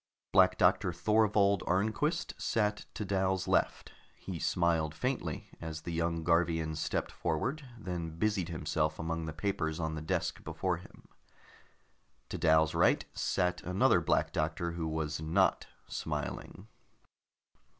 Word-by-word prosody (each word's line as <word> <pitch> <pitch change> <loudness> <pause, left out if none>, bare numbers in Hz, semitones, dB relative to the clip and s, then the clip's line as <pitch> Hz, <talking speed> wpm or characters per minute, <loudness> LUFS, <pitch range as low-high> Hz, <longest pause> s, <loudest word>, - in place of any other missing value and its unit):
Black 90 -1 +5
Doctor 95 +1 +3
Thorvold 105 +1 +3
Arnquist 110 - 0
sat 105 -2 0
to 105 - -3
Dal's 95 -1 0
left; - - +1 0.2
he 90 -4 -6
smiled 80 -3 +1
faintly 120 - -3
as 80 -1 -5
the 85 - -5
young 85 0 -1
Garvian 80 -1 +2
stepped 75 - -2
forward, 135 - -2
then 85 -6 -5
busied 100 -3 0
himself 80 -1 -1
among 80 0 -3
the - - -3
papers 80 -1 -2
on 80 -1 -1
the 80 - -4
desk 80 - -2
before - - -1
him. - - -15 1.2
To - - -4
Dal's 80 0 +4
right - - +3
sat 90 -1 0
another 95 +2 +3
Black - - +1
Doctor 80 +2 -1
who 85 -1 -3
was 80 -1 -2
not 80 +1 +2 0.2
smiling. - - -5
85 Hz, 130 wpm, -32 LUFS, 80-100 Hz, 1.2 s, Black